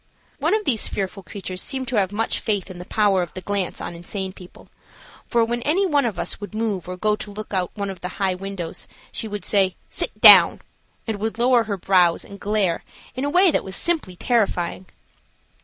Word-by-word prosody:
One - - +2
of 430 -1 -2
these 230 -6 +1
fearful 195 0 -4
creatures 185 -1 -6
seemed 265 -2 -1
to 250 - -2
have 195 -2 +1
much 225 +2 -1
faith 200 -3 -2
in 180 - -10
the 180 - -8
power 200 -3 +2
of 175 -3 -6
the 185 - -5
glance 200 -2 -2
on - - -5
insane 185 +2 -5
people, 180 -2 -15 0.6
for, 235 -1 +2
when 240 +1 -2
any 340 +10 +1
one 290 -7 +2
of 215 -6 -2
us - - -3
would 205 +1 -8
move 210 -5 -2
or 180 - -5
go 210 +2 +1
to 210 - -8
look 210 +1 -8
out 185 +1 -2
of 195 -2 -4
the 180 - -3
high 195 -2 +1
window 185 -3 -6 0.4
she 225 - -4
would 205 -3 -6
say 195 -3 +2
"Sit - - -2
down," - - +9 0.4
and 220 -3 -3
would 220 +1 -3
lower 240 -1 +3
her 205 -2 -3
brows 180 -2 +3
and 200 0 -12
glare 200 -5 0 0.3
in 260 +2 -3
a - - 0
way 360 +3 +5
that - - 0
was 190 0 -3
simply 310 - 0
terrifying. 185 -5 -1
200 Hz, 210 wpm, -22 LUFS, 185-225 Hz, 0.6 s, down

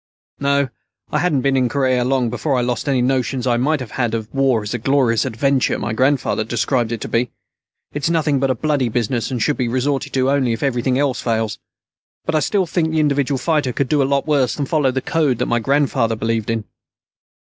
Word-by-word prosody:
"No, 140 -1 +1 0.4
I - - +1
hadn't 155 -7 +1
been 135 +1 +1
in 130 -2 +2
Korea 130 -1 +1
long 125 -2 +1
before 135 +3 -1
I 125 - +1
lost 125 +3 -2
any 130 -3 +2
notions 130 0 0
I 120 -2 +2
might 150 +5 +1
have 125 -4 -7
had 120 -3 -1
of 110 -1 -6
war 135 -5 +2
as 105 - -5
the 125 - -2
glorious 130 -2 +2
adventure 130 +2 +1
my 120 - -3
grandfather 130 -2 +1
described 120 +1 0
it 115 - -2
to - - -4
be. 120 +1 0 0.6
It's 145 +2 -1
nothing 155 -4 +1
but 135 0 +1
a 130 - +1
bloody 140 -1 0
business, 120 +1 -1
and 130 -3 -3
should 145 +6 +1
be 125 - 0
resorted 130 +3 -1
to 130 0 +2
only 130 -4 +1
if 115 - -4
everything 125 -1 0
else 135 -2 0
fails. 110 -4 -1 0.7
But - - -1
I 155 - +3
still 195 +4 +1
think 165 -1 0
the 160 0 0
individual 140 -2 +1
fighter 145 -2 0
could 135 +1 -1
do 150 -2 +3
a - - +3
lot 140 -1 +1
worse 140 -5 +1
than 145 - -2
follow 145 -2 +1
the 130 +1 -1
code 150 -6 +1
that - - 0
my 120 - +1
grandfather 135 -3 +1
believed 115 0 -2
in." 115 -1 -1
130 Hz, 220 wpm, -19 LUFS, 120-140 Hz, 0.7 s, I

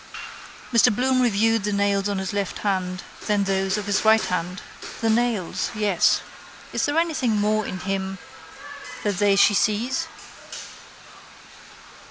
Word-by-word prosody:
Mr 235 +1 +6
Bloom 255 +1 +2
reviewed 225 -2 +2
the 210 - -1
nails 200 0 +1
of 200 -1 -2
his 190 0 -3
left 200 -1 -2
hand, 185 -2 -1 0.2
then 205 -2 +2
those 195 0 0
of 210 - -4
his 205 -1 0
right 220 0 +5
hand. 180 +1 -3 0.4
The 225 -1 +1
nails, 225 -5 0
yes. 205 -5 +2 0.5
Is - - 0
there 290 +2 -1
anything 305 -9 +1
more 210 +1 +1
in 185 - -5
him 195 0 -3 0.9
that 205 -4 -1
they 205 -1 +4
she 200 +1 +5
sees? 215 +5 0
205 Hz, 140 wpm, -23 LUFS, 195-225 Hz, 0.9 s, Mr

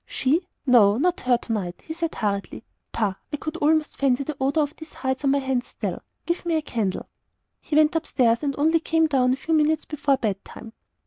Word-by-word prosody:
"She? 315 +7 0 0.2
No, 220 -6 +5
not 350 +6 +1
her 250 -1 +2
to 235 - -5
night!" 185 -5 -4
he 320 - -5
said, 330 0 -3
hurriedly. 200 0 -3 0.3
"Pah! 210 -4 0 0.2
I 295 - -2
could 310 +2 -5
almost 310 -1 +1
fancy 275 -1 +2
the 305 +2 -5
odour 280 +3 +2
of 290 +1 -5
these 315 -1 -12
hides 265 +1 -3
on - - +4
my 280 - +3
hands 265 -2 -1
still. - - -5 0.2
Give 340 +1 -1
me 340 -2 0
a 315 - +1
candle." 215 -9 -2 0.5
He 300 - -4
went 310 +2 +4
up 325 - -1
stairs, 235 -3 +2
and 280 -2 -1
only 320 +3 +3
came 325 0 +2
down 260 -4 +2
a - - +1
few 325 +4 -3
minutes 310 0 +2
before 290 -2 0
bed 205 -5 -2
time. 225 - -11
280 Hz, 220 wpm, -24 LUFS, 245-315 Hz, 0.5 s, No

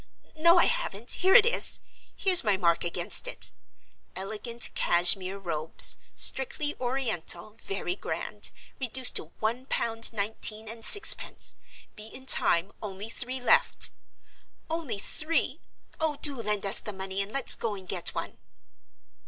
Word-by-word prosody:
No, 340 +3 +4
I - - +4
haven't. 365 - -4
Here 380 +1 +2
it - - +7
is; 470 - 0 0.4
here's 370 -3 +5
my 205 -4 0
mark 170 -3 0
against 170 - -1
it. - - -4 0.6
_Elegant 220 +5 -2
Cashmere 185 +2 +3
Robes; 165 -4 +6 0.2
strictly 290 +3 +2
Oriental, 225 -7 -2
very 200 - -5
grand; - - -6 0.3
reduced 260 0 +2
to - - -7
one 235 +4 -4
pound 225 -3 0
nineteen 215 0 -4
and 225 +1 -9
sixpence. 410 - +1 0.4
Be 215 0 -11
in 260 +3 -13
time. 185 -7 +4
Only 205 +1 -7
three 255 +3 -4
left._ 250 - +1 0.8
Only 320 -10 -4
three! 310 +10 -2 0.4
Oh, 315 -2 -1
do 290 -2 0
lend 210 -2 -2
us 195 +3 +3
the 210 - -8
money, 190 0 -4
and 195 +1 -4
let's 275 0 +3
go 220 -3 -3
and 190 -2 -12
get 180 -1 0
one!" - - -7
220 Hz, 140 wpm, -26 LUFS, 195-265 Hz, 0.8 s, it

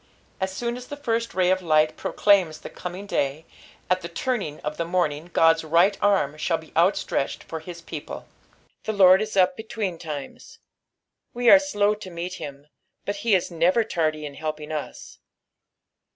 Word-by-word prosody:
As 190 0 -1
soon 235 +5 -3
as 250 0 -10
the 290 - -6
tirst 230 -5 -2
raj 185 -1 +3
of 185 0 +1
light 155 -2 +3
procLaims 185 -7 +2
the - - -8
coming 180 +3 -7
day, 145 -4 -1 0.4
at 185 0 +1
the 170 - -6
turning 180 - -3
of 150 0 -4
the - - 0
morning 170 -2 -1
God's 165 0 +4
right 170 +5 +4
aim 195 -9 +2
shnll 165 +2 0
be 160 - -16
outstretched 170 -4 +1
for 160 - -6
his 170 +1 -10
people. 155 -2 -7 0.6
The 220 - -1
Lord 190 -2 +7
is 215 -2 -3
up 185 -1 +4
berimes. 175 -10 -6 0.8
We 245 -1 +5
are 290 - +10
slow 210 -8 +1
to 210 -3 -9
meet 175 +1 -5
him, 140 0 -8 0.4
but 205 0 -2
he 210 0 +2
is 180 -1 -1
never 175 +7 +3
tardj 155 -7 -1
in 145 -1 -6
helping 155 +1 -5
us. 155 -1 -6
180 Hz, 170 wpm, -24 LUFS, 155-205 Hz, 0.8 s, are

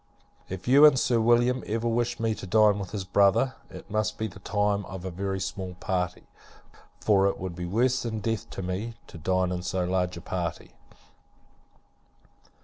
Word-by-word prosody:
If 95 +2 -7
you 140 +4 +7
and 150 -3 +8
Sir 120 -1 +2
William 120 +2 +3
ever 115 +2 -1
wish 120 +1 0
me 115 -1 +1
to 95 - -8
dine 105 +1 +4
with 95 -2 -5
his 105 -3 -4
brother, 100 +7 +3 0.2
it - - -11
must 110 -2 0
be 110 - -2
the 105 - -8
time 105 -1 0
of 95 -1 -8
a 95 - -3
very 95 +2 -3
small 95 -1 -5
party; 90 -1 -2 0.8
for 100 -2 +3
it 100 - -1
would 95 -2 -5
be 90 0 -5
worse 125 +7 +1
than 115 -3 -3
death 115 +1 -3
to 95 - -6
me, 100 +6 -4
to 85 - -12
dine 95 +2 +1
in 90 -1 -2
so 90 0 -1
large 90 -1 -1
a - - -8
party. 85 -2 -4
100 Hz, 185 wpm, -27 LUFS, 90-115 Hz, 0.8 s, and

